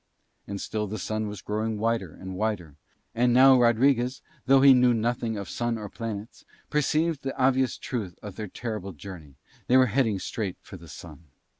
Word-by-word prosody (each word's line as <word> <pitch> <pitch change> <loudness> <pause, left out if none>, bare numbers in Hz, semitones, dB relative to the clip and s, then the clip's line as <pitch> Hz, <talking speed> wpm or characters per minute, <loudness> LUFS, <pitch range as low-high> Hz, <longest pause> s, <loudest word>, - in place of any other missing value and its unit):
And 100 0 -5
still 105 +1 -3
the 110 +2 -5
Sun 110 +3 -3
was 105 -2 -7
growing 110 +1 -2
wider 110 -5 -1
and 95 0 -8
wider. 95 -8 -2 0.4
And 120 +1 +2
now 130 0 +7
Rodriguez, 125 +2 +2 0.2
though 135 0 +6
he 140 -1 +9
knew 125 -1 +4
nothing 115 0 -1
of 100 -2 -5
Sun 120 +3 -2
or 105 -2 -7
planets, 110 0 -7 0.3
perceived 155 +1 +1
the 135 0 -5
obvious 130 -1 +2
truth 105 -9 -5
of 105 -3 -8
their 105 0 -5
terrible 105 -3 -5
journey: 80 -4 -11 0.3
they 125 - +5
were 130 - +6
heading 115 -3 +1
straight 95 0 -4
for - - -12
the 85 -2 -12
Sun. 80 0 -11
110 Hz, 180 wpm, -26 LUFS, 100-125 Hz, 0.4 s, he